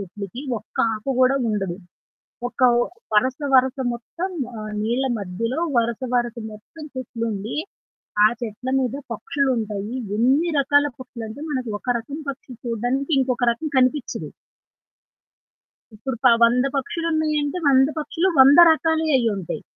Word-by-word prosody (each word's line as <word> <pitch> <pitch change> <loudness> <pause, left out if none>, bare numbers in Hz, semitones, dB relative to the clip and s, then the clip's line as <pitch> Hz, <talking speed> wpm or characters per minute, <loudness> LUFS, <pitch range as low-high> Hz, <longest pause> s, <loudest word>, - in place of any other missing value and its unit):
చెట్లకి. 200 +4 -7 0.2
ఒక్క - - -26 0.2
ఆకు 220 +6 -3
గూడా 255 +2 +4
ఉండదు. 195 -4 -2 0.7
ఒక - - -11 0.2
ఓ - - +3 0.3
వరస, 255 +6 +2 0.2
వరస 260 +1 +4 0.2
మొత్తం 335 +10 -5 0.2
ఆహ్, 215 0 -6
నీళ్ల 240 +5 0
మధ్యలో 230 - -3 0.2
వరుస, 235 0 0
వరస 240 -1 0 0.2
మొత్తం 265 +9 -12
చెట్లుండి, 230 -3 -4 0.7
ఆ - - +8
చెట్ల 230 +2 -5
మీద 250 0 -1 0.2
పక్షులుంటయి. 230 -4 -2 0.2
ఎన్ని 270 +9 +3
రకాల 285 +1 +3
పక్షులంటే 235 -1 -8
మనకు 255 -5 -2
ఒక - - -22
రకం 275 +6 -7
పక్షి 265 -1 -10
చూడ్డానికి 245 +6 -1
ఇంకొక 250 -1 0
రకం 310 +7 -5
కనిపిచ్చదు. 255 +1 0 1.7
ఇప్పుడు 250 +4 -4
ప - - +10 0.2
100 245 +3 +4
పక్షులున్నయంటే, 310 +1 -1
100 265 0 +5
పక్షులు, 330 +5 0
100 275 +2 +8
రకాలయి 320 -1 +1
అయ్యింటాయి. 200 -10 -2
250 Hz, 125 wpm, -22 LUFS, 225-280 Hz, 1.7 s, ప